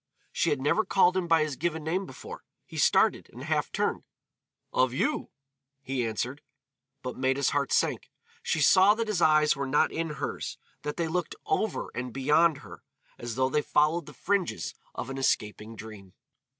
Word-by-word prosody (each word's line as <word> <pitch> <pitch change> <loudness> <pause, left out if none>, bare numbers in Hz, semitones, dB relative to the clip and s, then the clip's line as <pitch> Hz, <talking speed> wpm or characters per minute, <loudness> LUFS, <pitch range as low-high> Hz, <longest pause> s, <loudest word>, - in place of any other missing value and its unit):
She - - +1
had 145 - 0
never 150 +11 +2
called 185 -3 +3
him 185 -2 0
by 165 -2 +4
his 150 -3 -3
given 160 +1 -2
name 180 +5 -1
before. 130 - -10 0.2
He - - -10
started, - - +3
and - - -10
half - - -1
turned. - - -1 0.7
"Of 130 -1 +2
you," 135 - -1 0.5
he 130 -3 -1
answered. 125 +6 -3 0.6
But 125 -1 -5
Maida's 130 +1 +1
heart 140 -3 0
sank. - - +1 0.3
She 165 - -1
saw 190 +8 +6
that 230 0 -2
his 205 -5 -1
eyes 155 -1 +5
were 140 0 -3
not 145 +3 +3
in 165 0 -2
hers, - - -4 0.2
that 150 - -4
they 170 -1 0
looked 175 +2 -2
over 395 - -1
and 125 +1 -4
beyond 150 +5 +3
her, - - -11 0.4
as 120 -1 -5
though 130 0 +2
they 150 - +1
followed 155 +4 +1
the - - -10
fringes 195 -2 -1 0.2
of - - -5
an 135 - -5
escaping 110 -3 -1
dream. 105 -3 -11
150 Hz, 175 wpm, -28 LUFS, 130-170 Hz, 0.7 s, saw